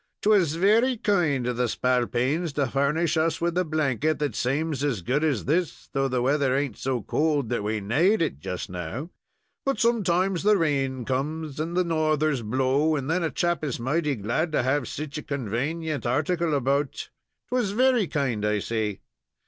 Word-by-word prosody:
"'Twas 195 -8 +3
very 225 +8 +3
kind 170 - +1
of 125 -1 -2
the 125 0 +1
spalpeens 130 +7 0
to 140 0 +1
furnish 145 +6 +1
us 160 0 +1
with 170 0 -1
a 180 - +2
blanket 155 -2 0
that 145 -1 -1
saams 145 +2 -1
as 125 -11 -1
good 135 - 0
as 145 -8 0
this, 165 +3 -1
though 135 0 +1
the 125 -2 -1
weather 135 -1 +2
ain't 140 -6 -1
so 125 -4 -2
cold 150 -6 0
that 120 -4 -1
we 110 +1 -1
naad 165 - +2
it 70 - -1
just 90 +4 -5
now; 90 - -6 0.5
but 275 0 -1
sometimes 195 -6 +2
the 210 +1 +4
rain 135 -6 0
comes 150 +3 -3
and 165 +3 -2
the 180 - +4
northers 155 -4 +1
blow, 130 +7 +1
and 140 +1 -2
then 180 +2 +1
a 165 - 0
chap 175 0 -1
is 140 -6 -2
mighty 145 +4 0
glad 120 - -1
to 150 - +1
have 130 +1 +1
seech 150 0 -5
a - - -6
convanient 140 +5 -3
article 155 +5 0
about. 140 +1 -1 0.4
'Twas 245 -4 0
very 250 -3 +3
kind 130 -9 -1
I 105 0 +1
say." 105 -1 -2
145 Hz, 180 wpm, -25 LUFS, 130-165 Hz, 0.5 s, the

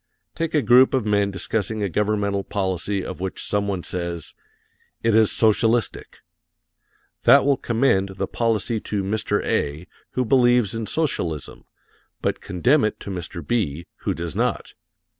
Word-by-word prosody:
Take 165 -1 -2
a 150 - +3
group 130 +2 +6
of 125 -5 0
men 100 -1 +2
discussing 105 +3 -2
a - - +1
governmental 100 +1 0
policy 95 0 -2
of - - -6
which 95 0 -4
some 105 -1 0
one 95 -3 -2
says: 85 -3 -4 0.7
"It 115 -1 +3
is 110 -1 +4
socialistic." 115 +1 +1 1.0
That - - +7
will 140 -1 +4
commend 110 -6 +1
the 95 - -2
policy 115 +1 -1
to 105 -1 -3
Mr. 105 +1 -1
A., 75 +4 -1 0.3
who 125 - 0
believes 120 -3 +3
in 115 -1 -3
socialism, 90 - -2 0.5
but - - -2
condemn 125 - +2
it 110 - -1
to 100 - -6
Mr. 85 -3 -6
B., 85 -9 -1
who - - -2
does 85 -1 -5
not. - - -1
105 Hz, 150 wpm, -23 LUFS, 95-115 Hz, 1.0 s, That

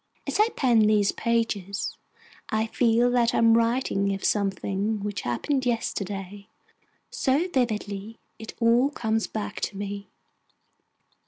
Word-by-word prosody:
As - - -2
I 430 +2 +5
pen 245 -4 +3
these 210 -2 +3
pages, 220 -5 -1 0.5
I 220 +1 +1
feel 235 +1 +2
that 240 -1 +2
I - - +2
am 230 0 +5
writing 230 -4 +1
of 195 - -6
something 200 +1 0
which 205 -1 -3
happened 260 - -1
yesterday, 200 -4 -3 0.6
so 280 +7 +1
vividly 220 - -2 0.2
it 220 - -9
all 240 +3 +4
comes 225 -5 -1
back 215 -1 -5
to 200 - -3
me. 200 0 -5
220 Hz, 130 wpm, -26 LUFS, 200-235 Hz, 0.6 s, I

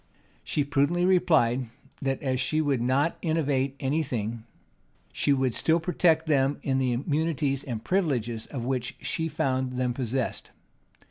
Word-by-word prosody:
She 145 - 0
prudently 145 +5 +1
replied, 135 -10 +3 0.3
that 135 -1 -1
as 130 -2 0
she 155 +4 0
would 140 -5 +1
not 135 +6 +1
innovate 140 -5 0
any 140 +4 0
thing, 115 -5 -4 0.7
she 145 - +1
would 130 -3 +2
still 160 +7 +2
protect 165 -1 +2
them 140 -2 +2
in 135 -1 +1
the 130 -1 +1
immunities 145 +1 0
and 115 -4 -5
privileges 120 - -1
of 125 -5 -5
which 125 -2 -2
she 160 -1 -2
found 130 -4 -1
them 125 -1 0
possessed. 130 0 -2
135 Hz, 145 wpm, -27 LUFS, 125-155 Hz, 0.7 s, replied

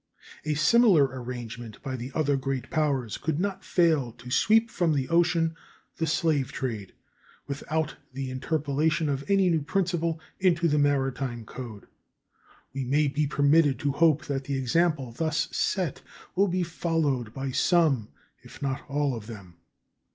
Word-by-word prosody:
A 155 -1 0
similar 190 - +5
arrangement 120 -3 -7
by 135 -2 -3
the 125 +2 -6
other 145 -3 +2
great 135 -2 -3
powers 140 -8 0
could 160 -1 -1
not 195 0 -2
fail 160 -8 +2
to 125 +1 -11
sweep 225 - +4
from 170 -3 +1
the 135 -2 0
ocean 165 -1 +2 0.4
the 165 - -1
slave 150 -4 +1
trade 110 -7 -4 0.5
without 155 +2 -3
the 130 0 -4
interpolation 150 +3 0
of 140 -1 -1
any 195 -2 +4
new 160 -2 +2
principle 170 0 -1 0.2
into 175 -3 +3
the 150 -1 +2
maritime 135 -4 0
code. 115 -4 -8 0.9
We 135 0 -2
may 145 +3 +2
be 150 +1 0
permitted 145 0 +3
to 145 -1 +1
hope 155 +2 +3
that 135 -1 -3
the 140 0 -2
example 135 0 +1
thus 155 +5 -1
set 180 -8 -1 0.3
will 200 +2 +4
be 180 0 0
followed 160 -8 -1
by 135 +2 -4
some 145 - +2 0.3
if - - -14
not 135 -1 -2
all 140 -2 0
of 110 -2 -8
them. 100 -7 -10
145 Hz, 150 wpm, -27 LUFS, 130-165 Hz, 0.9 s, similar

